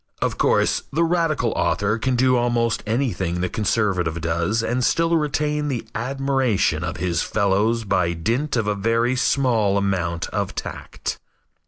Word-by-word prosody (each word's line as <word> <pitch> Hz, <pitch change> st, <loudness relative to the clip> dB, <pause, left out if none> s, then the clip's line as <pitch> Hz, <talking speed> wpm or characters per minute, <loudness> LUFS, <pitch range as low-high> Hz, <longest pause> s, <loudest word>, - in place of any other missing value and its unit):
Of -, -, -2 dB
course, -, -, +2 dB
the 165 Hz, +4 st, +1 dB
radical 165 Hz, -8 st, +1 dB
author 105 Hz, +2 st, 0 dB
can 130 Hz, +2 st, 0 dB
do 130 Hz, +1 st, +3 dB
almost 120 Hz, -1 st, +1 dB
anything 110 Hz, -8 st, -1 dB
the 90 Hz, -, -1 dB
conservative 95 Hz, -6 st, 0 dB
does 85 Hz, +7 st, 0 dB
and 125 Hz, +2 st, 0 dB
still 165 Hz, +6 st, +2 dB
retain 150 Hz, -1 st, 0 dB
the 130 Hz, -5 st, -3 dB
admiration 135 Hz, -2 st, 0 dB
of -, -, -4 dB
his 85 Hz, -2 st, 0 dB
fellows 110 Hz, +3 st, +1 dB
by 90 Hz, -4 st, +1 dB
dint 115 Hz, -, -1 dB
of 115 Hz, -3 st, 0 dB
a 105 Hz, -, +1 dB
very 115 Hz, +4 st, +1 dB
small 120 Hz, -6 st, +2 dB
amount 90 Hz, -4 st, -1 dB
of -, -, -3 dB
tact. -, -, -5 dB
115 Hz, 150 wpm, -22 LUFS, 100-130 Hz, -, do